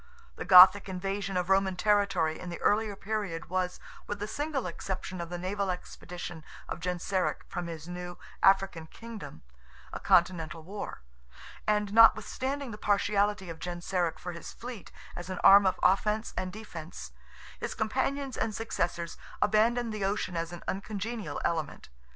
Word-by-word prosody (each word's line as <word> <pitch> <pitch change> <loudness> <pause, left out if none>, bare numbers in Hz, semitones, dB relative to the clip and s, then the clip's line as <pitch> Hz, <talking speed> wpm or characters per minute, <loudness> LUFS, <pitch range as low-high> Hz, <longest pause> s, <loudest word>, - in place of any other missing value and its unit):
The - - -6
Gothic 190 +2 +9
invasion 195 +1 -2
of 180 -1 0
Roman 190 0 +3
territory 195 -5 +2
in 180 - -7
the 170 - -6
earlier 210 0 +2
period 195 -5 -4
was, 185 -1 -1 0.3
with 205 - -3
the 205 +1 -4
single 290 +2 -2
exception 185 +1 -5
of 170 - -6
the 175 - -4
naval 195 +2 -2
expeditions 180 -2 -6 0.2
of - - -5
Genseric 180 +2 -1
from 175 -1 -4
his 165 -1 -7
new 175 0 -6 0.2
African 195 -4 +3
Kingdom, 225 - -10 0.5
a - - -4
continental 170 -2 +2
war; 190 - -7 0.6
and 210 -1 +1
notwithstanding 245 +4 +4
the 210 - -8
partiality 205 -1 +1
of 165 -1 -7
Genseric 175 0 -2
for 180 - -6
his 170 -1 -8
fleet, 235 -5 -9 0.2
as 175 +1 -7
an 185 - -4
arm 200 0 +9
of 185 - 0
offence 210 +3 +2
and 185 0 -3
defence, 165 - -8 0.5
his - - -4
companions 265 +4 -1
and 215 -2 -1
successors 175 -6 -2 0.2
abandoned 225 +2 +2
the 210 -2 -3
ocean 195 -2 -1
as 165 0 -2
an 175 - -9
uncongenial 205 -3 -4
element. 160 - -2
190 Hz, 150 wpm, -30 LUFS, 175-210 Hz, 0.6 s, Gothic